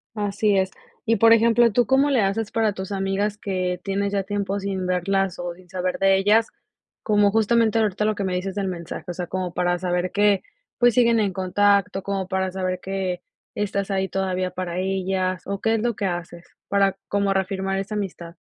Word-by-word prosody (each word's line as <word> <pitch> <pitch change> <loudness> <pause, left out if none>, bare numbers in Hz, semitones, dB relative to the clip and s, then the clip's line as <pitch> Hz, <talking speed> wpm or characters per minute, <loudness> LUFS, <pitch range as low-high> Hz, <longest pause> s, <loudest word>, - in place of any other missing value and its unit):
Así 205 0 +1
es. 190 0 +1 0.3
Y, 230 0 +2
por 225 +2 +7
ejemplo, 230 +1 +5
¿tú 245 +2 +3
cómo 270 +3 +3
le 265 -5 +3
haces 200 +2 0
para 220 -2 +1
tus 190 +1 -6
amigas 195 +2 -1
que 185 -3 -2
tienes 200 0 -1
ya 200 -1 +1
tiempo 200 0 -2
sin 190 -2 -3
verlas 190 +1 0
o 175 0 -4
sin 180 +1 -18
saber 185 -1 -2
de 195 0 +4
ellas? 210 +4 +3 0.6
Como 205 -2 +3
justamente 225 +1 +3
ahorita 210 -1 0
lo 215 0 +1
que 200 - -3
me 190 -1 -1
dices 185 +1 -3
del 195 -2 -1
mensaje, 170 -3 -6
o - - -5
sea, 175 0 -5
como 185 -1 -3
para 175 0 +1
saber 180 0 -1
que, 205 -1 +3 0.4
pues, 245 -1 +4
siguen 235 -1 +4
en 200 -3 0
contacto, 195 +1 +2
como 195 -1 -3
para 190 0 0
saber 185 -1 -2
que 190 -2 -3 0.3
estás 200 -1 -2
ahí 190 0 0
todavía 185 -1 -2
para 180 -1 -4
ellas, 185 -1 -1
o 200 0 -3
¿qué 225 +2 +1
es 220 - -1
lo 240 -2 0
que 200 - -3
haces 175 -1 -4 0.2
para 200 -1 +2
como 200 -1 +1
reafirmar 195 0 -1
esa 195 +2 -4
amistad? 175 -4 -5
195 Hz, 200 wpm, -23 LUFS, 185-205 Hz, 0.6 s, por